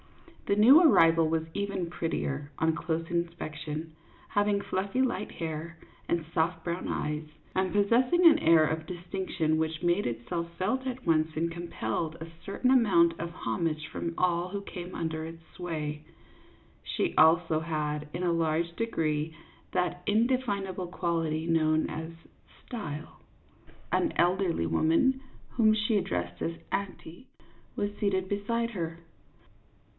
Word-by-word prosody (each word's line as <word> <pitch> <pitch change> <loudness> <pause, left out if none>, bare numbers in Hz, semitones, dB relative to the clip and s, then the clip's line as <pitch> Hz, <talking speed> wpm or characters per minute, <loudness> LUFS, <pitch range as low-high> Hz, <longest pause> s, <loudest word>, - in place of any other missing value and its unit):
The 200 - +3
new 260 +10 +8
arrival 165 - +6
was 160 0 +1
even 200 -4 -2
prettier 150 -4 -3
on 160 0 +2
close 165 0 -2
in 170 -1 +1
spection, 155 -1 -6 0.4
having 205 0 +2
fluffy 200 +5 -1
light 245 -5 -1
hair 165 +1 -5 0.3
and 170 -2 0
soft 165 0 0
brown 170 +1 -2
eyes, 150 +1 -2 0.3
and 190 -1 +1
possessing 245 - +3
an 320 -2 +8
air 160 -1 +6
of 160 +1 -2
distinction 175 -3 -2
which 160 0 -1
made 175 +4 +2
itself 120 +9 -3
felt 255 +8 0
at 255 0 -5
once 160 -1 +3
and 165 +1 0
compelled 170 -1 -3
a 160 0 -8 0.2
certain 235 +5 0
amount 170 -10 +5
of 170 - -3
homage 165 -3 -2
from 170 - -4
all 175 0 +1
who 200 +1 -4
came 180 -2 -7
under 160 -1 -2
its 165 +1 -8
sway; 155 -4 -4 0.8
she - - -1
also 160 0 +5
had, 150 -2 -2
in 175 - -4
a 175 -1 +2
large 165 +1 0
degree, 160 -8 -1 0.4
that 180 -1 -1
indefin 225 -2 +1
able 185 -1 -4
quality 165 -3 -1
known 155 -1 +2
as 160 +1 -5 0.6
style. 160 - -6 0.7
An 335 -3 +2
elderly 175 - +2
woman, 165 - +2 0.3
whom 220 -3 +4
she 215 +1 +1
addressed 90 - -2
as 165 - -1
" - - -33
auntie," 195 +1 -5 0.5
was 205 0 0
seated 190 -2 +1
beside 230 +4 -1
her. 165 -5 -4
170 Hz, 140 wpm, -29 LUFS, 160-200 Hz, 0.8 s, new